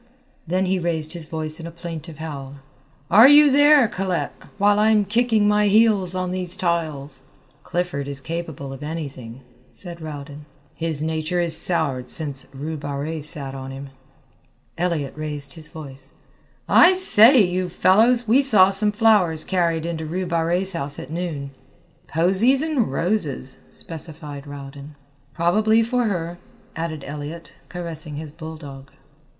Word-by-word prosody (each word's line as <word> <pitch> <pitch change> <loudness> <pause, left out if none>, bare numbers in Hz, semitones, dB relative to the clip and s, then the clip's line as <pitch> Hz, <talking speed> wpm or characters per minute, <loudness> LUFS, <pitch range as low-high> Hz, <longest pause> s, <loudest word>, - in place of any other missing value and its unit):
Then 185 +3 0
he 185 0 0
raised 165 -2 -1
his 170 -3 -7
voice 155 -1 -3
in 165 - -7
a - - -8
plaintive 165 -2 -8
howl, 140 -4 -7 0.6
"Are 225 +5 +9
you 290 0 +7
there, 290 -2 +6
Colette, 185 -3 -3 0.2
while 205 0 +3
I'm 215 -1 +3
kicking 220 0 +2
my 210 0 +3
heels 205 -3 +3
on 185 -1 -2
these 185 0 +1
tiles?" 155 -6 -2 0.4
"Clifford 175 -5 -3
is 140 -1 -4
capable 160 -3 -6
of 135 - -10
anything," 140 -6 -7 0.3
said 170 -3 -6
Rowden; 145 -1 -8 0.3
"his 160 -3 -3
nature 160 +2 -2
is 170 -2 +1
soured 150 -9 -1
since 145 -4 -2
Rue 150 +4 -5
Barrée 145 +2 -4
sat 140 -2 -2
on 135 0 -7
him." 135 +1 -9 0.8
Elliott 170 -5 -2
raised 150 -2 -2
his 155 -2 -6
voice: 135 -3 -9 0.5
"I 360 +2 +6
say, 270 - +6
you 180 0 -1
fellows, 225 +7 +3
we 245 +6 +5
saw 205 -9 +5
some 210 +2 0
flowers 205 -8 +3
carried 170 -3 0
into 160 -2 -4
Rue 185 +4 -3
Barrée's 175 +3 -1
house 145 -4 -4
at 140 - -9
noon." 160 -5 -4 0.6
"Posies 195 - +3
and 295 - 0
roses," 150 -6 -1
specified 150 -3 -7
Rowden. 140 +1 -10 0.4
"Probably 215 +6 +3
for 245 +1 0
her," 175 -4 -3 0.4
added 160 -3 -4
Elliott, 150 +3 -8 0.2
caressing 165 -4 -7
his 155 0 -7
bulldog. 155 -4 -10
165 Hz, 145 wpm, -22 LUFS, 150-190 Hz, 0.8 s, Are